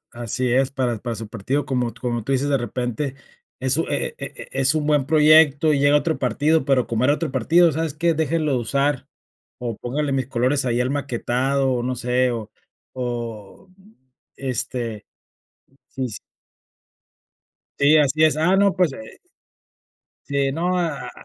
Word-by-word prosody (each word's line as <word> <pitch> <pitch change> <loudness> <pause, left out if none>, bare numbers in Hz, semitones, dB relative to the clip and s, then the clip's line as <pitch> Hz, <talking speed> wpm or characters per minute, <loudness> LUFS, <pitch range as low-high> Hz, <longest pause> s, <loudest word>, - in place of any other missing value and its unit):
Así 120 +1 -2
es, 130 +1 +2
para 125 -4 -1
para 115 0 -4
su 110 0 -7
partido, 125 +7 -2
como 125 -3 -1
como 120 -3 -3
tú 135 - -2
dices, 135 +2 +1
de 140 -2 +2
repente, 125 +3 -3 0.5
es - - +1
un - - 0
e 475 - -2
e - - -4
e - - -9
e 135 - -3
es 135 +3 +3
un 150 -1 -1
buen 150 -3 +2
proyecto 155 -1 +5
y 140 - +2
llega 145 +1 +5
otro 160 +2 0
partido, 145 +5 +1
pero 135 -2 +2
como 115 +1 -1
era 145 +3 +4
otro 155 -2 -3
partido, 165 +6 +3
¿sabes 160 -1 -2
qué? 165 +1 +1
Déjenlo 155 -1 0
de 125 - +1
usar, 140 +4 -1 0.5
o 120 -3 -4
póngale 140 +5 -2
mis 135 -2 0
colores 130 +3 +1
ahí 120 0 0
al 125 - 0
maquetado 135 0 0
o 120 - -1
no 130 +1 -2
sé, 125 +1 +1
o 110 -2 -6 0.4
mm 120 - -7 0.4
este 120 -4 -4 0.8
sí, 130 -1 -4
s 110 -4 -7 1.6
Sí, 145 +2 +5
así 150 +1 +3
es. 155 -1 +4
Ah, 175 +5 +3
no, 200 0 +3
pues, 180 -6 +1
eh 110 -3 -11 1.1
sino, 145 +6 0
a 165 -5 -3
a - - -8
135 Hz, 170 wpm, -22 LUFS, 120-150 Hz, 1.6 s, proyecto